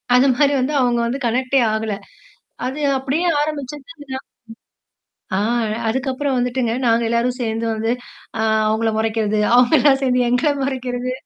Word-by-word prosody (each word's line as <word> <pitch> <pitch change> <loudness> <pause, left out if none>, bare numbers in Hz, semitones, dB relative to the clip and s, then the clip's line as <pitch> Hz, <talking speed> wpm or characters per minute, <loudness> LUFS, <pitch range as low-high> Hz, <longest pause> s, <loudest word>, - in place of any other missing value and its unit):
அந்த 260 +2 +5
மாரி 285 +1 +3
வந்து 275 +4 -1
அவங்க 240 -1 +2
வந்து 250 +4 -2
கனெக்டே 255 +3 +1
ஆகல. 220 -1 -2 0.7
அது 265 +4 -4 0.2
அப்படியே 275 +7 -1 0.2
ஆரம்பிச்சதுதான் 290 -1 -6 1.1
ஆ, - - +1 0.5
அதுக்கப்புறம் 265 +3 -1
வந்துட்டுங்க, 245 -1 0
நாங்க 230 0 +3
எல்லாரும் 235 +2 +1
சேந்து 225 -1 -2
வந்து, 220 +1 -1 0.5
ஆ - - +1 0.3
அவங்கள 220 +1 +1
மொறைக்கிறது. 220 -1 0 0.2
அவங்க 250 +3 +4
எல்லாம் 275 -2 +4
சேந்து 250 -2 +2
எங்கள 250 +5 +2
மொறைக்கிறது 255 -2 -3
250 Hz, 135 wpm, -20 LUFS, 230-270 Hz, 1.1 s, அந்த